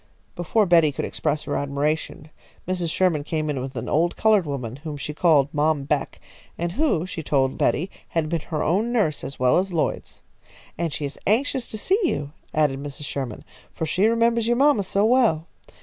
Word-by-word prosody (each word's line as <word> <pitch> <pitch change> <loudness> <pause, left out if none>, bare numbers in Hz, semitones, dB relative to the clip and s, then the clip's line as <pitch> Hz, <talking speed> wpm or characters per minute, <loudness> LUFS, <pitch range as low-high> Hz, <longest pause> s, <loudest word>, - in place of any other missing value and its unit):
Before 190 +5 +1
Betty 165 -4 +5
could 135 - -3
express 150 -1 -2
her - - -3
admiration, 150 +2 -2 0.4
Mrs. 180 -2 -1
Sherman 165 -3 +1
came 155 0 -2
in 135 -3 -3
with 135 +1 -6
an 115 - -4
old 170 +3 +1
coloured 210 -6 +3
woman 130 -4 -4
whom 150 0 -6
she 145 +2 -5
called 150 -4 +3
Mom 150 -1 +1
Beck, 140 - -2 0.4
and 170 0 -2
who, 185 - +1
she 175 -3 -5
told 135 -3 +1
Betty, 180 +6 0 0.2
had 165 -2 -1
been 165 +1 -1
her 155 -3 -1
own 205 +9 +1
nurse 200 -12 0
as 135 +1 -6
well 125 +5 +4
as 190 +1 -2
Lloyd's. 165 -3 -2 0.5
"And 170 0 -2
she 145 - -3
is 140 - -7
anxious 250 +4 +1
to 215 - -5
see 380 - +1
you," 145 - -1 0.2
added 145 -3 +1
Mrs. 145 0 -7
Sherman, 130 -6 -4 0.3
"for 160 - -2
she 185 +6 +2
remembers 230 0 +2
your 240 0 +2
mamma 280 -5 +4
so 200 +2 +1
well. 225 -10 +3
160 Hz, 195 wpm, -23 LUFS, 145-200 Hz, 0.5 s, Betty